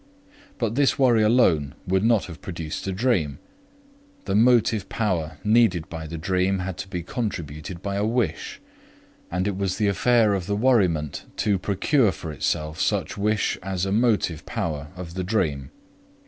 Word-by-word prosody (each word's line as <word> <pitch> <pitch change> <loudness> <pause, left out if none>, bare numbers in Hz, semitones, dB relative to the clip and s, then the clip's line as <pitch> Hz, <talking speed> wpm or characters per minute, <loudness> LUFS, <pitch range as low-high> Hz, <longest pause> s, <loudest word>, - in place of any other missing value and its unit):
But 115 -3 -1
this 140 +2 +2
worry 120 -5 +4
alone 95 - +3
would 95 +1 +1
not 115 -2 +3
have 85 -3 -10
produced 85 -1 -5
a - - 0
dream; 95 - 0 0.9
the - - -2
motive 115 -2 +3
power 90 -8 -1
needed 105 -6 +3
by 80 -1 -6
the 85 +1 -6
dream 95 +3 +1
had 90 0 -4
to - - -5
be 90 -3 -4
contributed 85 - -5
by 100 0 -2
a 100 - 0
wish, 110 -7 -1 0.7
and 90 +3 -1
it 100 - -1
was 95 -1 -1
the 105 - +1
affair 110 +1 +3
of 95 -2 -2
the 100 - 0
worriment 95 - +1
to 100 -3 +1
procure 105 - +2
for 80 -1 -7
itself 75 +2 -2
such - - 0
wish 105 +1 0
as 95 -1 -2
a 95 - -2
motive 105 -8 +1
power 75 -3 -3
of 90 -2 -8
the 95 +1 -3
dream. 90 -9 -1
95 Hz, 165 wpm, -24 LUFS, 85-110 Hz, 0.9 s, worry